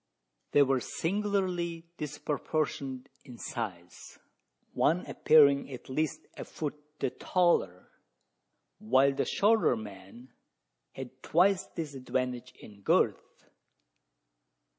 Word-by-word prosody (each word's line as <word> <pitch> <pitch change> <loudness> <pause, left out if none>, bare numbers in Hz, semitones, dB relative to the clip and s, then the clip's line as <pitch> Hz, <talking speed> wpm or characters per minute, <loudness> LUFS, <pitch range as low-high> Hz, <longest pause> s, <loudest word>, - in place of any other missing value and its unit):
They 145 - +7
were 135 -1 +2
singularly 180 - -1
disproportioned 145 -2 -3 0.2
in 125 -4 -12
size: 90 -10 -6 0.6
one 175 +4 +2
appearing 140 -3 +5
at 130 - -9
least 155 +3 -1
a - - -6
foot 150 -2 -4 0.2
the - - -1
taller, 170 - +1 0.9
while 130 +5 +3
the - - -1
shorter 215 - +3
man 105 +3 -11 0.6
had 130 0 -9
twice 190 +3 +3
this 160 -4 -4
advantage 125 -1 -3
in 100 -2 -14
girth! - - 0
140 Hz, 95 wpm, -30 LUFS, 125-165 Hz, 0.9 s, They